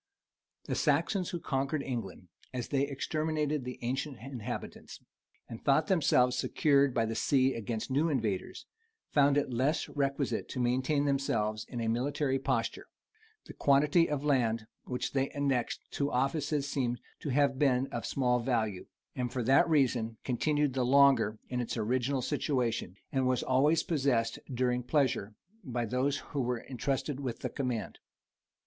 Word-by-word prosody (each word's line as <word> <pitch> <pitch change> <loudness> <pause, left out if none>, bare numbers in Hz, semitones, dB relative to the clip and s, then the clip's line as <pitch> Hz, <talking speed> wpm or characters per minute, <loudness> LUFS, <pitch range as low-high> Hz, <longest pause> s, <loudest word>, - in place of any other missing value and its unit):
[*] - - -60
The - - -3
Saxons 170 +5 +1
who 175 - -3
conquered 140 0 -1
England, 105 -8 -5 0.3
as 125 - -3
they 140 0 +1
exterminated 150 0 -1
the 125 0 -6
ancient 135 +3 -2
inhabitants, 120 -1 -7 0.5
and 115 - -9
thought 145 +3 +3
themselves 125 -8 +3
secured 140 +1 +3
by 115 - +2
the 115 - -3
sea 130 +2 +2
against 115 +1 -4
new 150 +5 +2
invaders, 110 -10 -2 0.5
found 145 -1 +4
it 140 -3 0
less 135 +7 +1
requisite 140 -1 -1
to 130 - -5
maintain 130 +4 +1
themselves 110 -6 0
in 120 - -5
a 115 - -1
military 135 +3 0
posture: 135 - -1 0.6
the - - -10
quantity 150 +4 +3
of 145 -1 -2
land 115 -6 +1 0.2
which 125 -1 -3
they 135 0 +1
annexed 135 -4 0
to 140 0 -1
offices 140 +2 0
seems 125 -4 -1 0.2
to 150 - -5
have 135 0 +2
been 130 -3 +3
of 120 - -3
small 125 -2 +1
value; 115 -6 -1 0.3
and 125 -1 -2
for 125 - -2
that 135 +7 +4
reason 125 -7 +2
continued 145 +2 +1
the 130 -1 0
longer 135 -4 +4
in 125 -1 -2
its 120 - -4
original 125 +4 0
situation, 120 - -1 0.2
and 130 -1 +1
was 130 -1 +1
always 145 +5 +3
possessed 130 -9 0
during 125 0 0
pleasure 125 -6 0 0.3
by 120 -5 -2
those 130 +5 0 0.2
who 140 - 0
were 125 0 0
intrusted 135 +3 -3
with 130 -4 -4
the - - -2
command. 125 -7 -3
130 Hz, 155 wpm, -31 LUFS, 120-140 Hz, 0.6 s, found